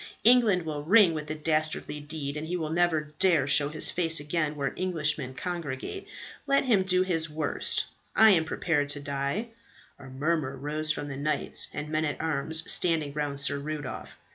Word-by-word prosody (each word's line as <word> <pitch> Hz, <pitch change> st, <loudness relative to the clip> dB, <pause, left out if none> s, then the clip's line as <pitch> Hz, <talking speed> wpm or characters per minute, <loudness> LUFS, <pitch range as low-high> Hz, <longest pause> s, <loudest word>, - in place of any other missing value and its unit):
England 225 Hz, -6 st, +5 dB
will 150 Hz, -2 st, -4 dB
ring 185 Hz, +2 st, +5 dB
with 155 Hz, -1 st, -5 dB
the 155 Hz, -, -4 dB
dastardly 155 Hz, -1 st, -1 dB
deed, 145 Hz, -1 st, -5 dB
and 155 Hz, +1 st, -5 dB
he 180 Hz, +2 st, -2 dB
will 155 Hz, -2 st, -4 dB
never 160 Hz, -3 st, 0 dB
dare 165 Hz, -8 st, +3 dB
show 145 Hz, 0 st, +3 dB
his 155 Hz, -, +3 dB
face 165 Hz, -2 st, +2 dB
again 150 Hz, 0 st, -2 dB
where 140 Hz, -2 st, -2 dB
Englishmen 155 Hz, -7 st, -1 dB
congregate. 170 Hz, -, -5 dB, 0.4 s
Let 275 Hz, 0 st, +3 dB
him 220 Hz, -7 st, +3 dB
do 185 Hz, 0 st, +2 dB
his 165 Hz, -3 st, -1 dB
worst. 150 Hz, -1 st, -1 dB, 0.3 s
I 220 Hz, 0 st, +7 dB
am 165 Hz, -4 st, +3 dB
prepared 160 Hz, -3 st, -1 dB
to 145 Hz, -, -3 dB
die." 140 Hz, +10 st, -3 dB, 0.5 s
A 140 Hz, -, -12 dB
murmur 135 Hz, +1 st, -2 dB
rose 150 Hz, +3 st, -2 dB
from 145 Hz, -2 st, -4 dB
the 140 Hz, -2 st, -6 dB
knights 150 Hz, +1 st, +2 dB
and 150 Hz, +1 st, -5 dB
men 155 Hz, 0 st, 0 dB
at 150 Hz, -, -3 dB
arms 160 Hz, 0 st, 0 dB
standing 160 Hz, -5 st, +1 dB
round 145 Hz, -1 st, -3 dB
Sir 140 Hz, 0 st, +1 dB
Rudolph. 150 Hz, -1 st, -6 dB
155 Hz, 180 wpm, -27 LUFS, 145-170 Hz, 0.5 s, I